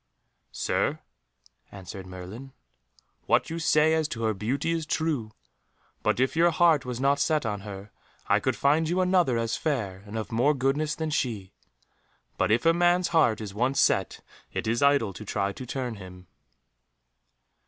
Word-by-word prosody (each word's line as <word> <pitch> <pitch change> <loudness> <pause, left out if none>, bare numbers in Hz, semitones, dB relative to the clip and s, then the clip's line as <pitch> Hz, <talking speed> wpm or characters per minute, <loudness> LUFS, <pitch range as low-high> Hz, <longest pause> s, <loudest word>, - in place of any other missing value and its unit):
"Sir," - - -1 0.7
answered 95 0 -9
Merlin, 95 +9 -9 0.7
"what - - +2
you 165 - -3
say 160 -1 +3
as 160 -1 +1
to 115 -5 -5
her 110 -1 +1
beauty 130 +10 -2
is 165 -2 -2
true, 155 -9 -1 0.7
but, - - 0
if 130 +3 +1
your 170 +1 +5
heart 165 -4 +3
was 125 -1 -4
not 140 +1 +2
set 150 -2 +1
on 105 -2 -2
her, 100 0 -9 0.3
I - - +3
could - - -1
find 155 +3 +2
you 180 +2 0
another 180 -9 +3
as 115 0 -1
fair, 105 -12 -2
and 105 +2 -6
of 110 - -5
more 130 +6 +2
goodness, 140 +4 0
than 160 -1 -3
she. 110 -10 -2 0.8
But - - 0
if 115 +6 +2
a 165 - +6
man's 175 +1 +2
heart 120 -10 +3
is 100 -3 -6
once 130 +6 0
set 95 -6 +1 0.3
it - - -3
is 115 +2 0
idle 140 -8 +3
to 105 - -9
try 100 -1 -1
to 130 - -8
turn 125 -3 -4
him." 90 -1 -11
130 Hz, 170 wpm, -27 LUFS, 105-155 Hz, 0.8 s, a